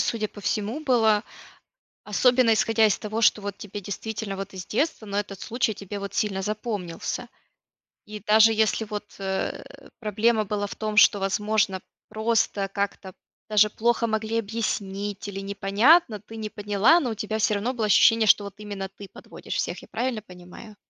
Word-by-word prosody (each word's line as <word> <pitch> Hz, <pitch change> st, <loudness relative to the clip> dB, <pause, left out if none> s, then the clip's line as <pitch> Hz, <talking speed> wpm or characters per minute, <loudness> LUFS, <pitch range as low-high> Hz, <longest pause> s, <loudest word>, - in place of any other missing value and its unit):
судя 215 Hz, -2 st, -1 dB
по 205 Hz, -, -12 dB
всему 210 Hz, +7 st, -2 dB
было. 225 Hz, -7 st, +3 dB, 0.8 s
Особенно 245 Hz, +2 st, +3 dB
исходя 225 Hz, +1 st, +3 dB
из 210 Hz, -, +2 dB
того, 215 Hz, +2 st, -3 dB
что 210 Hz, -1 st, +4 dB
вот 200 Hz, -1 st, -5 dB
тебе 205 Hz, 0 st, -7 dB
действительно 205 Hz, +1 st, -5 dB
вот 195 Hz, +1 st, -7 dB
из 185 Hz, 0 st, -7 dB
детства, 235 Hz, -2 st, -1 dB
но 200 Hz, 0 st, -3 dB
этот 200 Hz, -2 st, -4 dB
случай 230 Hz, -2 st, -1 dB
тебе 200 Hz, +1 st, -7 dB
вот 200 Hz, 0 st, -6 dB
сильно 195 Hz, -2 st, -1 dB
запомнился. 210 Hz, -5 st, -4 dB, 0.8 s
И 210 Hz, 0 st, -8 dB
даже 220 Hz, +2 st, +5 dB
если 220 Hz, 0 st, +1 dB
вот, 210 Hz, -1 st, -7 dB
э, 190 Hz, 0 st, -2 dB, 0.4 s
проблема 215 Hz, 0 st, +1 dB
была 205 Hz, 0 st, -2 dB
в -, -, -8 dB
том, 215 Hz, -1 st, -4 dB
что 205 Hz, -2 st, +6 dB
возможно 200 Hz, 0 st, 0 dB, 0.3 s
просто 220 Hz, -2 st, 0 dB
как-то, 200 Hz, -1 st, -4 dB, 0.3 s
даже 210 Hz, 0 st, +4 dB
плохо 235 Hz, +1 st, +1 dB
могли 220 Hz, +1 st, -1 dB
объяснить 205 Hz, -2 st, -4 dB
или 195 Hz, -1 st, -6 dB
непонятно, 205 Hz, -, +3 dB
ты 220 Hz, +2 st, -14 dB
не 215 Hz, -1 st, -5 dB
поняла, 210 Hz, -, +3 dB
но 250 Hz, -6 st, -2 dB
у -, -, -3 dB
тебя 215 Hz, +1 st, -3 dB
всё 215 Hz, -1 st, +2 dB
равно 235 Hz, +6 st, -2 dB
было 220 Hz, -3 st, -1 dB
ощущение, 225 Hz, +2 st, +5 dB
что 205 Hz, -, +6 dB
вот 200 Hz, -1 st, -8 dB
именно 200 Hz, -2 st, -6 dB
ты 195 Hz, 0 st, -12 dB
подводишь -, -, -9 dB
всех, -, -, -2 dB
я -, -, -14 dB
правильно 235 Hz, -1 st, -2 dB
понимаю? 180 Hz, +3 st, -13 dB
210 Hz, 170 wpm, -25 LUFS, 200-220 Hz, 0.8 s, что